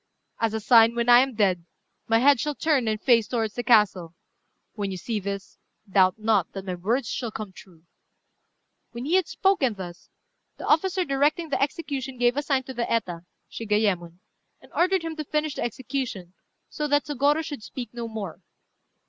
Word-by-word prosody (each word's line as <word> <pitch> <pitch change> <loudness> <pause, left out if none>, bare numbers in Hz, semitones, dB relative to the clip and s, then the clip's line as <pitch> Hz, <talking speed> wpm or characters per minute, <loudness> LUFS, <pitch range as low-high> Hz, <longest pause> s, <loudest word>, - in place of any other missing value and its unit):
As 225 -1 0
a - - -1
sign, 230 +1 +5
when 235 0 0
I 240 0 +9
am 265 -1 +1
dead, 190 -5 +2 0.4
my 225 - +4
head 275 +2 +5
shall 295 +2 -2
turn 280 -7 +1
and 215 -1 0
face 230 -3 +3
towards 225 -3 -1
the 245 - -3
castle. 195 -8 +3 0.6
When 205 -3 -3
you 190 - -4
see 220 +4 -3
this, 200 0 -6 0.3
doubt 185 -1 +4
not 215 -5 +1
that 195 -1 -6
my 185 - -3
words 220 +8 -1
shall 235 0 -3
come 215 -2 -7
true." 175 -4 -16 1.1
When 235 +2 -6
he 315 - -1
had 370 -3 +3
spoken 335 - +1
thus, 175 -3 -9 0.5
the - - -7
officer 370 +3 +2
directing 295 +4 +1
the 280 - -1
execution 275 -3 -3
gave 245 0 +2
a 290 - 0
sign 275 -3 0
to 260 - -8
the 240 -1 -3
Eta, 180 -7 -1 0.3
Shigayémon, 205 -6 -1 0.4
and - - -20
ordered 365 0 +2
him 325 -1 -4
to 305 - -3
finish 300 0 -1
the - - -5
execution, 240 -7 -4 0.3
so 300 - -3
that 290 0 +2
Sôgorô 295 +2 +1
should 290 -6 -6
speak 245 +2 -8
no 235 -1 -5
more. 210 -7 -6
235 Hz, 185 wpm, -25 LUFS, 205-280 Hz, 1.1 s, I